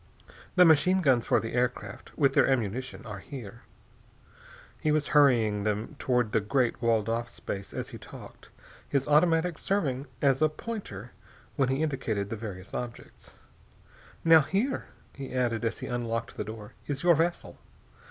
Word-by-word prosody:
The 180 -1 +7
machine 180 +4 +5
guns 130 -7 +3
for - - +4
the 115 - -5
air 125 0 +3
craft, 105 -4 -11
with 140 -3 +3
their - - +4
ammunition, 125 0 -2
are 105 -3 -6
here...." 120 -1 -9 1.2
He 155 - +1
was 150 -1 +1
hurrying 120 -8 +4
them 105 +6 -2
toward 125 -4 +1
the - - +3
great 120 +3 0
walled 115 -3 +2
off 115 +1 -1
space 100 -4 -6
as - - -5
he - - -9
talked, - - -12 0.4
his 140 -1 0
automatic 165 +2 +3
serving 145 -9 -1
as 135 0 +2
a 155 - +5
pointer 150 - -7 0.4
when 135 -3 +2
he 135 +4 0
indicated 115 -9 -2
the - - -1
various 100 -4 -8
objects. 120 -1 -8 0.9
"Now, 165 -1 +8
here," 200 - -1 0.3
he 135 -2 -7
added 120 -3 0
as 115 0 -2
he - - -4
unlocked 115 -2 -3
the - - -3
door, 105 -1 -9
"is 145 0 -3
your 175 -1 +6
vessel. 170 +2 -1
125 Hz, 160 wpm, -28 LUFS, 115-150 Hz, 1.2 s, Now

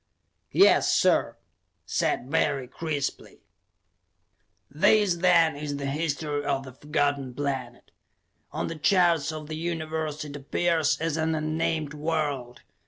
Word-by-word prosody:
"Yes, - - +5
sir!" - - +2 0.5
said 125 - -1
Barry 140 -5 +1
crisply. 150 -1 -4 1.3
This, 180 +5 +3
then, 170 -3 +4
is 145 0 -4
the 140 - -4
history 145 0 -2
of 140 -1 -1
the 130 -1 -11
Forgotten 145 -2 -1
Planet. 130 -3 -4 0.6
On - - -3
the 165 -1 -6
charts 170 -3 +3
of 155 -1 -7
the 155 - -5
Universe 160 -2 -3
it 145 -1 -8
appears 160 +2 0
as 165 -1 -1
an 160 0 0
unnamed 155 -1 -1
world. 150 -5 -2
150 Hz, 120 wpm, -26 LUFS, 140-160 Hz, 1.3 s, Yes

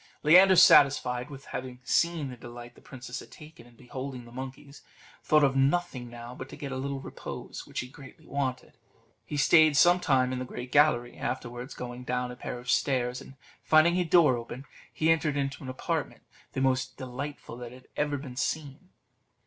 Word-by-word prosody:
Leander, 185 +5 +7
satisfied 135 -6 +5
with 135 -1 -10
having 125 -1 -6
seen 165 +1 +1
the - - -8
delight 120 0 -11
the - - -19
princess 125 -2 -8
had - - -12
taken 150 -6 -14
in 120 - -20
beholding 130 0 -7
the 120 - -14
monkeys, 135 +3 -9 0.4
thought 155 -1 +4
of 135 -1 +3
nothing 135 -3 0
now 120 +1 -9
but 130 +1 -9
to - - -9
get 140 -2 -6
a - - -3
little 135 +1 -3
repose, - - -8
which - - -4
he 125 - -8
greatly 135 0 -14
wanted. 130 -2 -4 0.5
He 150 - -4
stayed 155 +1 +5
some 175 +4 +6
time 130 -5 +2
in 130 - -3
the - - -3
great 125 0 -8
gallery; 130 -5 +3
afterwards, 125 +1 -5
going 125 0 -7
down 125 0 -2
a - - -8
pair 125 - -6
of 120 +1 -12
stairs, 125 -1 0
and 135 - -13 0.3
finding 165 +3 +4
a 180 - +2
door 160 -6 +4
open, 120 +3 -8 0.3
he 160 +1 +2
entered 155 -3 +1
into 140 0 -2
an 130 - -6
apartment 130 - -3 0.3
the 130 - -2
most 130 -1 0
delightful 130 0 -7
that 125 +1 -10
ever 145 -1 0
was 130 -2 -5
seen. 155 +5 -4
135 Hz, 190 wpm, -28 LUFS, 125-145 Hz, 0.5 s, Leander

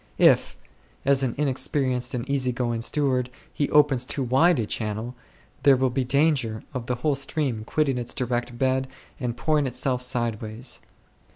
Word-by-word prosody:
If, - - +4 0.5
as 140 0 +3
an 130 -3 -1
inexperienced 130 -3 0
and 120 0 -4
easy 135 -3 +1
going 120 -2 -2
steward, 130 -1 +1 0.2
he 145 - -1
opens 145 -4 +4
too 135 +2 -2
wide 140 +7 +4
a 115 - 0
channel, 110 +3 -3 0.5
there 140 -1 +6
will 130 0 +1
be 130 +1 0
danger 130 -4 +1
of 125 -3 -5
the 125 - 0
whole 150 - +4
stream 135 -4 -1
quitting 135 -1 0
its 120 - -3
direct 120 -1 -2
bed 130 0 +1 0.3
and 120 -2 -3
pouring 150 0 +1
itself 125 0 -1
sideways. 120 -1 -2
130 Hz, 160 wpm, -25 LUFS, 120-140 Hz, 0.5 s, there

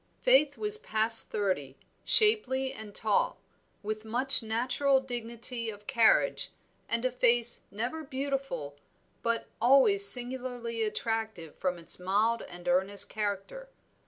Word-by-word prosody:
Faith 300 - +2
was 425 0 +1
past 220 - +2
thirty, 185 -10 -4 0.3
shapely 270 - +1
and 210 -2 -12
tall, 215 -2 -1 0.4
with 215 +1 -5
much 250 +5 +2
natural 250 +5 -1
dignity 235 -2 -6
of 205 -1 -11
carriage, 235 -3 +1 0.4
and 230 +2 -2
a 255 - 0
face 240 -1 +2
never 245 +10 -6
beautiful, 270 - -6 0.4
but 230 0 -2 0.2
always 275 - +5
singularly 245 - +4
attractive 220 -6 -5
from 180 -1 -4
its 170 +1 -8
mild 210 +6 -1
and 175 0 -12
earnest 190 +3 +4
character. 210 - -6
230 Hz, 120 wpm, -28 LUFS, 210-265 Hz, 0.4 s, always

